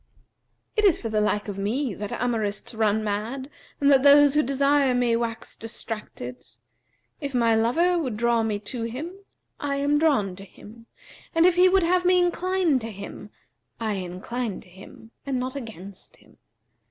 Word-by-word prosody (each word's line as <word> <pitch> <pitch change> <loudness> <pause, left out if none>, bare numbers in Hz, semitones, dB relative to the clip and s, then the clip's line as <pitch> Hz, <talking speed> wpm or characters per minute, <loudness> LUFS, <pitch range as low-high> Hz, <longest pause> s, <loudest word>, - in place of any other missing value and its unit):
It 430 - +2
is 385 -6 +4
for 225 - -4
the 215 -1 +1
like 210 0 0
of 200 -1 -5
me 230 +5 -1
that 205 +1 -6
amourists 225 -3 -2
run 220 -1 +1
mad 225 +7 -3 0.3
and 285 0 +4
that 270 -1 +6
those 285 0 +7
who 300 - +4
desire 275 -1 +2
me 245 -2 +2
wax 230 -1 -3
distracted. 210 - -7 0.8
If 280 -3 -5
my 230 -2 +3
lover 330 +11 +2
would 255 -9 -3
draw 235 0 +2
me 220 -2 -1
to 235 +3 -6
him, 275 +10 -5 0.5
I 285 -1 -2
am 285 +1 +1
drawn 260 - +2
to 195 - -10
him; 225 +4 -15 0.5
and 330 +1 +5
if 365 - +6
he 360 +1 +5
would 380 0 +3
have 360 +1 +2
me 365 0 +4
incline 355 -3 +1
to 225 -1 -6
him, 200 0 -9 0.5
I 220 -2 -1
incline 195 +5 -4
to - - -18
him 195 +4 -14
and 270 -2 -2
not 255 +1 -4
against 200 -7 -9
him. - - -23
240 Hz, 175 wpm, -25 LUFS, 215-290 Hz, 0.8 s, those